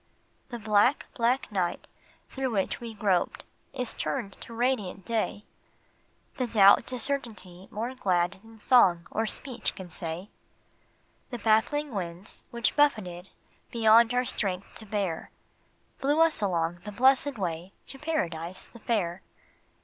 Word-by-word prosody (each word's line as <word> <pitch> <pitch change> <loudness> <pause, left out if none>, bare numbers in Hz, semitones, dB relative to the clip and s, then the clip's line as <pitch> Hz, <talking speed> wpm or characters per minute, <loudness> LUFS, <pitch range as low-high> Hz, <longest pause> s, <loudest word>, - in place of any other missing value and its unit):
The 240 - -5
black, 215 +5 +3
black 240 +1 +1
night 180 -4 -1 0.4
through 265 -1 -3
which 200 -2 -1
we 230 -2 -7
groped 195 -4 0 0.3
is 250 -3 -3
turned 230 -8 -3
to - - -9
radiant 230 -6 -1
day, 220 -2 -2 0.9
The 255 - 0
doubt 200 -3 +6
to 255 -1 -3
certainty 220 -9 -3
more 230 +4 -4
glad 185 -5 0
than 225 0 -16
song 190 -9 +5
or 225 +1 0
speech 245 -1 -2
can 185 -2 -9
say; 170 +4 -4 1.0
The 245 - -4
baffling 235 +6 +2
winds 180 0 -5
which 235 -1 0
buffeted 195 -11 +1 0.4
beyond 230 0 +5
our 250 +1 +2
strength 195 -5 -3
to 220 - -10
bear, 195 -5 -2 0.7
Blew 290 +3 +1
us 325 -5 +4
along 175 -3 0
the 210 - -6
blessed 265 +4 +3
way 175 -1 -3
to 270 - -3
Paradise 180 - -3
the 235 - -14
Fair. 190 -6 -1
215 Hz, 135 wpm, -28 LUFS, 185-245 Hz, 1.0 s, doubt